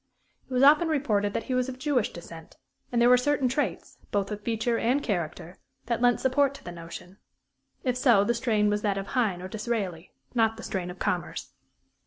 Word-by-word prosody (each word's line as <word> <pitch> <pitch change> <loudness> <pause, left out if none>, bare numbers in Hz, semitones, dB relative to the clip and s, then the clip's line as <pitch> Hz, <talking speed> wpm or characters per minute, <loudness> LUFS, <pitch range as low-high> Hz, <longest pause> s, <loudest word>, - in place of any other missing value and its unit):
It - - -20
was 250 - +3
often 300 +4 +6
reported 215 -10 +1
that - - -2
he 255 - -3
was 255 0 +1
of 255 - -7
Jewish 260 -5 0
descent, 165 -1 -11 0.3
and 240 - +1
there 240 - +5
were 250 0 +7
certain 285 0 +1
traits, 265 +4 -2
both 200 0 -1
of 210 0 -4
feature 230 +1 0
and 255 +5 +1
character, 175 -3 -3 0.3
that 235 0 -1
lent 245 -1 +4
support 275 +1 +2
to - - -13
the 175 - -7
notion. 175 +3 -10 0.6
If 250 -2 0
so, 240 -6 +4
the 235 - +1
strain 225 -3 +1
was 210 0 +1
that 205 -2 0
of 195 0 -5
Heine 205 -8 0
or - - -4
Disraeli, 200 -5 -3 0.2
not 225 -2 +2
the 225 - -9
strain 180 -2 -3
of 180 - -8
Commerce. 180 -3 -3
225 Hz, 205 wpm, -27 LUFS, 195-255 Hz, 0.6 s, were